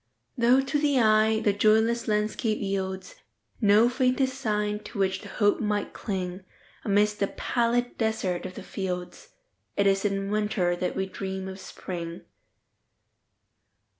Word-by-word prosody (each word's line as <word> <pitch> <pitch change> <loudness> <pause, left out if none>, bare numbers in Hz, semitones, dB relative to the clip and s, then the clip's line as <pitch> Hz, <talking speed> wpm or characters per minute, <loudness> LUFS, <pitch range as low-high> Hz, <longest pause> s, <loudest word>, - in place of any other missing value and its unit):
Though, 245 +1 +4
to 280 +2 -1
the 285 -3 +2
eye, 220 -1 +4
the 205 - +2
joyless 220 +3 +3
landscape 215 +1 0
yieldsNo 200 - 0
faintest 255 +1 +1
sign 210 -5 -1
to 215 - -8
which 190 -1 0
the - - -10
hope 205 -2 +2
might 210 -1 -1
cling,—Amidst 200 +2 -2
the 200 - +2
pallid 245 +2 -1
desert 200 -6 -1
of 185 - -11
the - - -8
fields,—It 200 - -5
is 195 0 +3
in 195 -1 -1
Winter 210 -4 +1
that 180 +1 -2
we 190 - 0
dream 190 0 -5
of 190 0 -7
Spring. 170 -3 -6
210 Hz, 130 wpm, -27 LUFS, 190-235 Hz, -, Though